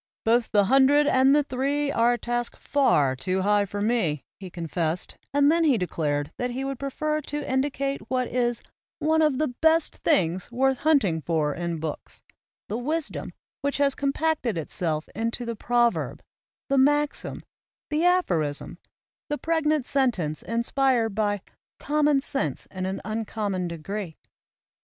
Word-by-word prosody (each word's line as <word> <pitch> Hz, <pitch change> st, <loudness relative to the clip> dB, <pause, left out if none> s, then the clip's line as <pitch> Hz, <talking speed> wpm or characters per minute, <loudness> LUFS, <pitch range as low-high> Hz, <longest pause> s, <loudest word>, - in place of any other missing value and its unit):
"Both 230 Hz, +1 st, +3 dB
the 205 Hz, -2 st, +3 dB
hundred 275 Hz, +5 st, +5 dB
and 265 Hz, 0 st, +4 dB
the 295 Hz, -, +4 dB
three 280 Hz, +2 st, -1 dB
are 235 Hz, -2 st, +3 dB
a -, -, -1 dB
task 240 Hz, +1 st, -3 dB
far 150 Hz, -, +2 dB
too 185 Hz, +8 st, -1 dB
high 205 Hz, 0 st, +3 dB
for 205 Hz, +1 st, -5 dB
me," 205 Hz, -, 0 dB, 0.2 s
he 190 Hz, -2 st, -8 dB
confessed, 170 Hz, 0 st, -3 dB, 0.2 s
and 285 Hz, +1 st, +4 dB
then 335 Hz, +1 st, +3 dB
he 285 Hz, -7 st, +4 dB
declared 150 Hz, -5 st, -1 dB
that 245 Hz, -, -1 dB
he 255 Hz, +2 st, -3 dB
would 275 Hz, -2 st, -4 dB
prefer 305 Hz, +3 st, -2 dB
to 295 Hz, 0 st, -4 dB
indicate 275 Hz, -2 st, -1 dB
what 255 Hz, -1 st, 0 dB
is 240 Hz, -1 st, -1 dB, 0.3 s
"one 320 Hz, +1 st, +2 dB
of 300 Hz, -4 st, +3 dB
the 305 Hz, -4 st, -1 dB, 0.5 s
things 175 Hz, +1 st, +2 dB
best -, -, -22 dB
worth 265 Hz, +1 st, +1 dB
hunting 260 Hz, -, +2 dB
for 155 Hz, -2 st, 0 dB
in 170 Hz, -1 st, -3 dB
books," 155 Hz, -1 st, -6 dB, 0.4 s
the 220 Hz, +4 st, -3 dB
wisdom 305 Hz, +5 st, -3 dB, 0.3 s
which 285 Hz, 0 st, -1 dB
has 280 Hz, -1 st, +3 dB
com 280 Hz, 0 st, 0 dB
pacted 295 Hz, -, 0 dB
itself 160 Hz, 0 st, -2 dB
into 230 Hz, +3 st, -2 dB
the 235 Hz, 0 st, -3 dB
proverb, 240 Hz, +1 st, 0 dB, 0.4 s
the 275 Hz, -1 st, +2 dB
maxim, 290 Hz, +2 st, +1 dB, 0.5 s
the 305 Hz, +2 st, +1 dB
aphorism, 175 Hz, -, +1 dB, 0.5 s
the 295 Hz, -, -1 dB
pregnant 310 Hz, -4 st, +1 dB
sentence 225 Hz, -, 0 dB
inspired 235 Hz, -1 st, +1 dB
by 205 Hz, 0 st, +1 dB
4 195 Hz, -, -24 dB
' -, -, -73 dB
common 295 Hz, -2 st, +3 dB
sense 155 Hz, -, -2 dB
in 185 Hz, 0 st, -3 dB
an 190 Hz, +1 st, -4 dB
uncommon 215 Hz, -4 st, -2 dB
degree. 170 Hz, +1 st, -5 dB
240 Hz, 155 wpm, -25 LUFS, 185-280 Hz, 0.5 s, hundred